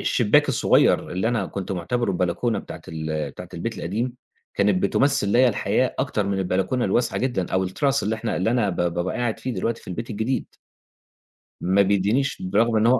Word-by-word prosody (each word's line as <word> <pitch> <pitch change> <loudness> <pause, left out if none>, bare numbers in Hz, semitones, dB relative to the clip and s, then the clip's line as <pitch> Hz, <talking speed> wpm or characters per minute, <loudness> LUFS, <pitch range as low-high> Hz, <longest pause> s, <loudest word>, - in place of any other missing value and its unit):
...الشبّاك - - +3
الصغيّر - - +3
اللي 95 +5 0
أنا 115 -6 0
كنت 95 -1 -5
مُعتبره 100 +5 -1
البلكونة 90 +6 0
بتاعة - - -8
ال 80 -1 -3
بتاعة - - -10
البيت - - -4
القديم، 115 +8 -2 0.4
كانت 100 -2 +2
بتمثّل 135 +2 +2
ليّا 125 +5 +5
الحياة 110 - 0
أكتر 105 - 0
من 100 -1 -1
البلكونة 95 +7 0
الواسعة 120 - +1
جدًا، 120 -9 -1
أو 95 0 +2
التراس 135 +9 0
اللي 105 +2 0
إحنا 110 0 -3
اللي 95 +5 +1
أنا 115 -5 +2
ب - - -5
بابقى 85 +1 -1
قاعد 120 -3 -1
فيه 130 -1 -4
دلوقتي 115 0 -2
في - - -13
البيت 115 +6 -5
الجديد 110 +5 -1 1.2
ما 95 +3 +3
بيدّينيش 100 - +1
بالرغم 120 -12 +2
إن 110 +2 +3
هو 125 0 +5
105 Hz, 185 wpm, -23 LUFS, 95-120 Hz, 1.2 s, ليّا